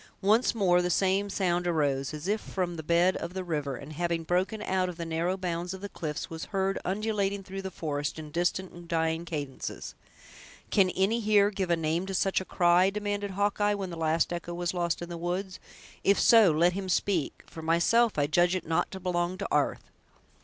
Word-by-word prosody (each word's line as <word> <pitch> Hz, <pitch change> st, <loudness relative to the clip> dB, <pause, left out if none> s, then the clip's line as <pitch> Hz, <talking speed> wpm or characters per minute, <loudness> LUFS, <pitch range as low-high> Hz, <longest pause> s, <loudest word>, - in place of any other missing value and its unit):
Once 220 Hz, +5 st, +3 dB
more 180 Hz, -5 st, +3 dB
the 180 Hz, -, -1 dB
same 195 Hz, +3 st, +2 dB
sound 175 Hz, -3 st, 0 dB
arose, 145 Hz, -5 st, 0 dB
as 155 Hz, +3 st, -6 dB
if 210 Hz, +2 st, 0 dB
from 180 Hz, -2 st, -3 dB
the 160 Hz, -, -5 dB
bed 170 Hz, +4 st, +3 dB
of 180 Hz, -, -6 dB
the 190 Hz, -, -2 dB
river, 150 Hz, -6 st, -2 dB
and 140 Hz, +5 st, -9 dB
having 170 Hz, +1 st, -1 dB
broken 185 Hz, +6 st, 0 dB
out 185 Hz, -2 st, 0 dB
of 175 Hz, -, -7 dB
the 170 Hz, -, -4 dB
narrow 165 Hz, +3 st, -1 dB
bounds 180 Hz, 0 st, -3 dB
of 190 Hz, -, -11 dB
the 200 Hz, -, -4 dB
cliffs, 150 Hz, -5 st, -4 dB
was 160 Hz, -1 st, -6 dB
heard 195 Hz, -1 st, -1 dB
undulating 200 Hz, 0 st, -1 dB
through 195 Hz, +1 st, -6 dB
the 190 Hz, -, -5 dB
forest, 150 Hz, -4 st, -3 dB
in 155 Hz, -1 st, -8 dB
distant 175 Hz, +3 st, -1 dB
and 175 Hz, 0 st, -12 dB
dying 160 Hz, 0 st, 0 dB
cadences. 145 Hz, -5 st, -5 dB, 0.8 s
"Can 195 Hz, -3 st, +4 dB
any 195 Hz, +6 st, +1 dB
here 210 Hz, -2 st, +4 dB
give 190 Hz, -3 st, -2 dB
a 170 Hz, -, +4 dB
name 165 Hz, +3 st, -1 dB
to 195 Hz, -, -3 dB
such 190 Hz, +1 st, +1 dB
a -, -, -7 dB
cry?" 175 Hz, +1 st, +4 dB
demanded 205 Hz, 0 st, -3 dB
Hawkeye, 205 Hz, 0 st, +2 dB
when 195 Hz, -3 st, -4 dB
the -, -, -5 dB
last 165 Hz, +1 st, +1 dB
echo 175 Hz, 0 st, -5 dB
was 175 Hz, 0 st, -2 dB
lost 175 Hz, -1 st, -1 dB
in 175 Hz, -, -7 dB
the 170 Hz, -, -5 dB
woods; 180 Hz, +2 st, -3 dB, 0.4 s
"if 200 Hz, -, +4 dB
so, 225 Hz, -5 st, +7 dB
let 170 Hz, +3 st, +3 dB
him 190 Hz, 0 st, -4 dB
speak; 180 Hz, -2 st, 0 dB
for 160 Hz, -, -10 dB
myself, 170 Hz, +8 st, +3 dB
I 145 Hz, -, +3 dB
judge 175 Hz, +5 st, +3 dB
it 185 Hz, -, -3 dB
not 160 Hz, 0 st, 0 dB
to 190 Hz, -, -5 dB
belong 175 Hz, 0 st, -1 dB
to 200 Hz, -, -3 dB
'arth!" -, -, +1 dB
180 Hz, 210 wpm, -28 LUFS, 165-195 Hz, 0.8 s, so